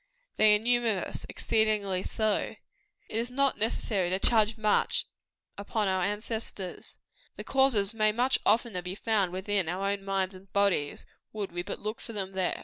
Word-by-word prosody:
They 215 -1 +6
are - - +2
numerous 230 -3 0
exceedingly 210 -4 +1
so. 215 +1 -1 0.5
It - - -8
is 235 +2 -1
not 275 +2 +1
necessary 205 -4 0
to 185 - +1
charge 220 +1 +3
much 215 -1 +2 0.5
upon 205 +1 -1
our 185 -1 +1
ancestors. 205 -2 -4 0.4
The - - -7
causes 240 -7 +2
may 215 -1 +2
much 245 +4 +1
oftener 220 -4 +2
be 180 +1 -5
found 205 -4 +1
within 190 -1 0
our 195 +3 -1
own 200 -1 -3
minds 195 -1 0
and 190 0 -15
bodies, 200 -8 +1 0.3
would 210 -2 -4
we 175 0 -3
but 195 +3 -5
look 215 +2 -4
for 230 - -8
them 195 -2 -3
there. 190 -2 -1
205 Hz, 165 wpm, -29 LUFS, 190-220 Hz, 0.5 s, They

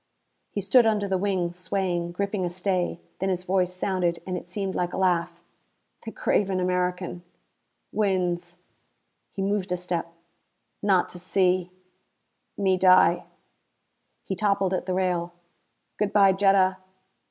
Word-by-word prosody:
He 205 - -3
stood 230 +4 +5
under 210 -2 +1
the 190 -1 0
wing, 185 -3 -1
swaying, 175 -1 -2
gripping 200 +1 -2
a 175 - 0
stay. 180 -1 -1 0.2
Then 190 - 0
his 180 -1 -1
voice 185 -1 +1
sounded, 180 -2 -1
and 185 - -3
it 175 0 -7
seemed 195 0 -3
like 175 0 -2
a - - -3
laugh. 175 -3 0 0.6
"The - - -5
craven 190 -2 0
American 180 -1 -1 0.7
wins." 180 -4 -1 0.7
He 195 - -4
moved 195 -2 -1
a 180 - +1
step. 175 -2 -3 0.7
"Not 195 -3 +3
to 180 - -9
see 185 0 +1 0.9
me 190 -2 +2
die 185 -1 +5 0.5
" - - -49
He 190 - -3
toppled 200 -2 +1
at 185 - -2
the 185 - 0
rail. 175 -2 -1 0.7
"Good 210 -1 +1
by, 200 -2 +6
Jetta." 190 -1 +3
185 Hz, 140 wpm, -26 LUFS, 180-195 Hz, 0.9 s, by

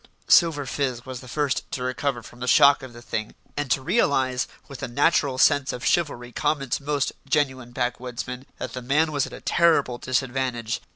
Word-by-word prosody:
Silver 160 -5 +5
Fizz 130 -3 -2
was 130 -2 -6
the 125 - -12
first 140 +1 -1
to 125 - -2
recover 130 -1 -2
from 120 - -14
the 125 - -4
shock 140 +2 +6
of 130 -1 -9
the 120 0 -13
thing, 110 -2 -4 0.2
and 145 -2 -2
to 130 - +1
realise, 135 - +1 0.2
with 140 - -9
the - - -3
natural 140 +1 +2
sense 145 0 +4
of 125 - -6
chivalry 125 -8 0
common 135 +1 -1
to - - 0
most 145 -1 0 0.2
genuine 130 -4 0
back 125 0 -2
woodsmen, 125 +1 -6
that - - -6
the 125 - -5
man 150 +6 +2
was 145 -2 0
at - - -11
a - - -9
terrible 150 -8 +2
disadvantage. 125 -3 -1
130 Hz, 195 wpm, -24 LUFS, 125-145 Hz, 0.2 s, shock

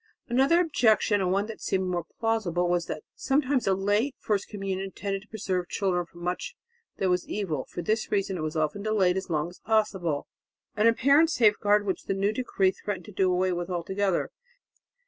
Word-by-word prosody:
Another 270 +8 +4
objection, 220 - +3
and 180 -1 +1
one 200 +2 +1
that 225 0 -8
seemed 190 -1 0
more 175 -2 -2
plausible, 205 -6 0
was 175 -1 0
that - - -5
sometimes 270 -2 +1
a 190 - +4
late 205 +8 +1
first 205 -2 -1
communion 195 -2 -4
tended 195 0 -4
to 210 - -19
preserve 185 -5 -3
children 180 -3 0
from 175 0 -13
much 180 +1 -3 0.4
that 190 - 0
was 180 0 0
evil; 165 -10 -2
for 175 - -6
this 215 +5 -1
reason 195 -2 0
it 170 - -4
was 155 0 -3
often 155 +6 -1
delayed 200 -4 +2
as 190 0 -4
long 155 -1 0
as 175 - -16
possible, 190 -8 0 0.5
an 215 +2 +4
apparent 280 +7 +5
safeguard 210 -6 +3
which 190 - -2
the 195 - -1
new 200 +2 +1
decree 210 -6 +1
threatened 190 -2 -5
to - - -10
do 185 -1 +2
away 185 +1 +1
with 175 0 -3
altogether. 190 +2 -1
195 Hz, 190 wpm, -27 LUFS, 180-215 Hz, 0.5 s, apparent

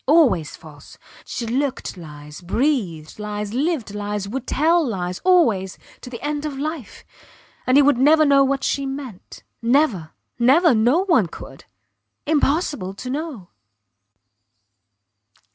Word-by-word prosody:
Always 260 - +3
false. 150 -3 -15 0.3
She 235 - -5
looked 260 +4 -2
lies, 150 -2 -11
breathed 185 - -2
lies, 210 0 -5
lived 275 -5 -1
lies 205 -1 -4
would 260 +5 -5
tell 330 +4 +2
lies 180 -8 -3
always 235 - +2 0.2
to - - -9
the 240 -2 -8
end 295 0 -2
of 295 -3 -4
life! 300 -3 -6 0.6
And 255 +2 +4
he 290 - +7
would 275 -3 +3
never 310 +3 +5
know 280 -1 +5
what 270 0 -1
she 275 -1 -1
meant. 270 -8 -8 0.2
Never! 235 - +1 0.3
Never! 290 +7 +5
No 245 - +2
one 315 - +3
could. - - -12 0.6
Impossible 290 - 0
to 250 +5 -6
know. 280 - -5
255 Hz, 130 wpm, -21 LUFS, 200-295 Hz, 0.6 s, he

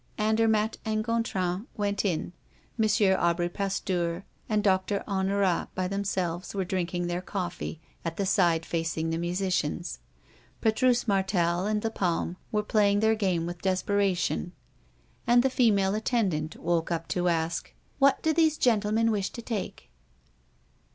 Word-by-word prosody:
Andermatt 220 0 +2
and 215 0 -1
Gontran 205 -3 -1
went 205 -1 0
in. 180 -3 -1 0.5
M. 220 - +4 0.3
Aubry 175 0 +1
Pasteur 185 -3 -2 0.2
and 210 -1 +1
Doctor 195 +1 +1
Honorat, 195 -2 +1
by 185 0 -1
themselves, 185 -2 -2
were 190 -1 -1
drinking 175 -1 -2
their 175 +1 -2
coffee, 180 -4 -4 0.2
at 165 -1 -4
the 200 - 0
side 170 -4 +2
facing 165 -1 -2
the 165 - -1
musicians. 175 -2 -1 0.6
Petrus 240 +2 +2
Martel 190 -2 +1
and 210 0 0
Lapalme 180 -5 -1 0.2
were 210 -1 +1
playing 205 -1 +3
their 220 +1 +3
game 185 -6 0
with 175 0 -6
desperation; 190 - 0 0.7
and 240 0 +5
the 265 - +2
female 200 -6 +3
attendant 200 -9 0
woke 170 -1 -1
up 165 -1 -2
to 180 0 0
ask: 165 0 -1 0.3
"What 275 -1 +4
do 320 - +3
these 315 -1 +3
gentlemen 225 -2 +2
wish 200 -3 -1
to 235 - -8
take?" 220 -5 -5
195 Hz, 140 wpm, -28 LUFS, 175-215 Hz, 0.7 s, and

